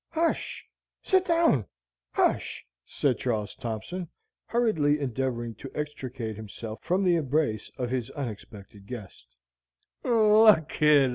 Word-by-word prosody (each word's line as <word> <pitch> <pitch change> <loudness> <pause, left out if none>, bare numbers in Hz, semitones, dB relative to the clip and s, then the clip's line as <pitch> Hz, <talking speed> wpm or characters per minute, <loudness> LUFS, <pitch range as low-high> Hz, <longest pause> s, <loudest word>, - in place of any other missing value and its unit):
"Hush 330 0 -1 0.4
sit 375 -1 +3
down! 330 - +3 0.5
hush!" - - 0 0.2
said 130 -6 0
Charles 110 -5 -1
Thompson, 135 +9 -5 0.4
hurriedly 160 -12 +2
endeavoring 125 -3 -2
to 135 - -7
extricate 130 -7 -4
himself 110 +1 -7
from 185 +3 +1
the 180 -2 +4
embrace 140 -7 0
of 125 -1 -2
his 125 -3 -1
unexpected 105 -6 -8
guest. 110 -5 -9
130 Hz, 100 wpm, -27 LUFS, 110-155 Hz, 0.5 s, the